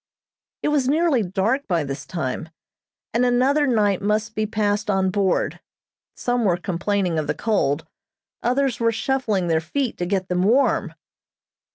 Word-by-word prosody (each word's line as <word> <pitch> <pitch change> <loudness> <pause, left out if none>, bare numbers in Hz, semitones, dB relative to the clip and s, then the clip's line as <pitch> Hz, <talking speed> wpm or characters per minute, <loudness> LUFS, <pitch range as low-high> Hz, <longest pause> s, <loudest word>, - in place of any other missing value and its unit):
It - - +2
was 280 -4 +1
nearly 310 -4 +3
dark 210 +8 0
by 170 -4 +1
this 140 -1 -6
time, 155 -2 -3 0.6
and 235 - +2
another 260 +4 +3
night 205 -6 +2
must 215 +2 0
be 215 0 -1
passed 210 -1 0
on 190 -1 +2
board. 195 -1 0 0.6
Some 245 -1 0
were 180 -5 +2
complaining 180 -1 -1
of 155 - -3
the - - -1
cold. 160 -9 0 0.6
Others 255 0 +1
were 230 -1 +2
shuffling 225 -4 0
their 160 -1 +2
feet 255 - -2
to 175 - -1
get 190 -1 -1
them 180 -1 0
warm. 215 -5 +2
210 Hz, 155 wpm, -22 LUFS, 180-245 Hz, 0.6 s, nearly